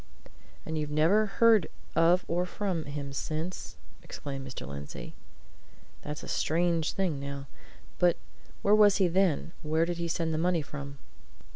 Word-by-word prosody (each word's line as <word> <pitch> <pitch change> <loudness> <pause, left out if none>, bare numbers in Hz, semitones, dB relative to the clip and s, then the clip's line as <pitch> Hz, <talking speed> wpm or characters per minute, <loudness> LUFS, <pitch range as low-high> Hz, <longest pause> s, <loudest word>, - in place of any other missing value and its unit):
"And 160 -1 -2
you've 150 -1 -2
never 165 +9 +3
heard 220 -3 +4 0.3
of 175 +2 +4
or 175 +2 0
from 180 -4 -2
him 140 -1 -5
since?" 160 +6 -4 0.2
exclaimed 135 -2 -6
Mr. 130 - -6
Lindsey. 70 -3 -7 0.9
"That's 150 0 -6
a - - -7
strange 165 0 +1
thing, 180 -7 0
now. 140 0 -5 0.5
But 175 -1 +4 0.5
where 200 - +4
was 210 -2 +6
he 190 -2 +4
then? 175 -2 +1
Where 160 +1 +1
did 170 0 -3
he 170 - -1
send 165 -1 -1
the 155 - 0
money 175 -2 +2
from?" 140 -1 -7
165 Hz, 150 wpm, -29 LUFS, 145-180 Hz, 0.9 s, was